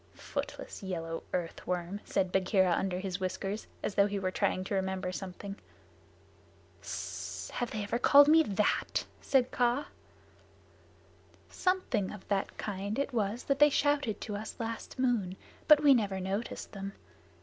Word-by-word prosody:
"Footless, - - -5
yellow 165 -4 -4
earth 170 -2 -3
worm," 180 +2 -2
said 185 -1 0
Bagheera 190 -1 +3
under 180 +1 0
his 185 0 -3
whiskers, 195 +3 -3 0.2
as - - -1
though 200 +1 +4
he 205 0 -2
were 185 -1 -1
trying 185 - 0
to 190 - -4
remember 190 -1 -1
something. 195 +2 -6 1.2
"Sssss! - - -5
Have 245 - -2
they 215 -1 -3
ever 225 +4 -1
called 285 +3 +8
me 320 +2 +7
that?" 210 -7 0 0.2
said 255 -2 +2
Kaa. 245 +3 +2 1.7
"Something 365 - 0
of 210 -2 -10
that 195 -1 -1
kind 200 +1 -3
it 280 -1 -1
was 220 +1 -1
that 275 0 0
they 295 0 +8
shouted 285 -6 +1
to 210 - -4
us 215 +2 -6
last 230 -1 -5
moon, 230 -8 +1 0.3
but 300 -1 +8
we 285 -2 +8
never 200 -6 +1
noticed 195 +5 -3
them. 195 -1 -6
205 Hz, 150 wpm, -31 LUFS, 190-245 Hz, 1.7 s, called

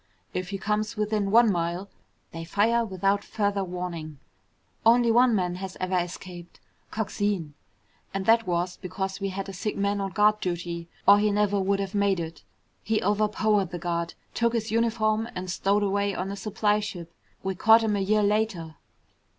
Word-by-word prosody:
If 180 -1 -3
he 200 - -3
comes 210 +2 -2
within 210 -1 0
one 230 +1 +6
mile, 175 +2 -2 0.4
they 165 0 -6
fire 220 +7 +2
without 200 -1 0
further 200 -2 -1
warning. 175 -4 -5 0.7
Only 235 +1 +5
one 240 0 +5
man 180 -2 -1
has 190 0 -7
ever 185 0 -1
escaped. 175 0 -5 0.3
Coxine. 205 -7 -2 0.6
And 195 -1 -3
that 225 0 +4
was 175 +1 -1
because 190 +1 -4
we 195 -1 -2
had 195 +1 -5
a 195 - -7
sick 195 +3 -3
man 200 0 0
on 195 - -2
guard 210 +1 +4
duty, 170 -2 -4 0.2
or 205 +1 +8
he 210 0 +2
never 205 -1 +1
would 195 +1 +1
have 195 0 -3
made 200 -2 +2
it. 165 0 -6 0.4
He 220 0 0
overpowered 210 -1 +1
the 175 - -5
guard, 170 0 -3 0.2
took 235 0 +1
his 225 -1 -2
uniform, 225 -1 +1
and 180 0 -4
stowed 200 +3 +1
away 200 0 0
on 185 +2 -3
a - - -4
supply 210 +1 0
ship. 175 -5 -6 0.3
We 190 - -1
caught 225 +5 +5
him 215 -2 +1
a - - 0
year 210 +2 +2
later." 200 -7 0
200 Hz, 175 wpm, -26 LUFS, 180-215 Hz, 0.7 s, or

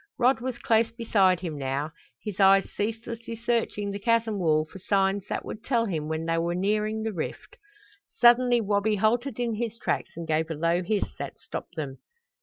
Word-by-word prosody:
Rod 250 -1 +3
was 255 -1 -3
close 225 0 +2
beside 200 -6 +2
him 160 -5 -4
now, 140 +3 -2 0.3
his 210 -3 -5
eyes 195 0 +6
ceaselessly 230 +2 -4
searching 230 -3 -1
the 200 - -4
chasm 225 -1 +1
wall 155 -3 +2
for 190 - -12
signs 195 +1 +1
that - - -3
would 220 - -7
tell 235 -2 +1
him 160 -7 -2
when 160 +1 -2
they 165 0 +1
were 170 +1 -1
nearing 215 +3 0
the 220 -1 -2
rift. 165 - -6 0.5
Suddenly 240 0 +5
Wabi 205 +1 +1
halted 235 +4 +1
in 235 -2 0
his 230 0 -3
tracks - - -2
and 170 -1 -5
gave 160 +1 +1
a 160 - -3
low 170 +3 +1
hiss 205 +3 -1
that - - -5
stopped - - -8
them. 140 -5 -5
205 Hz, 190 wpm, -27 LUFS, 170-230 Hz, 0.5 s, eyes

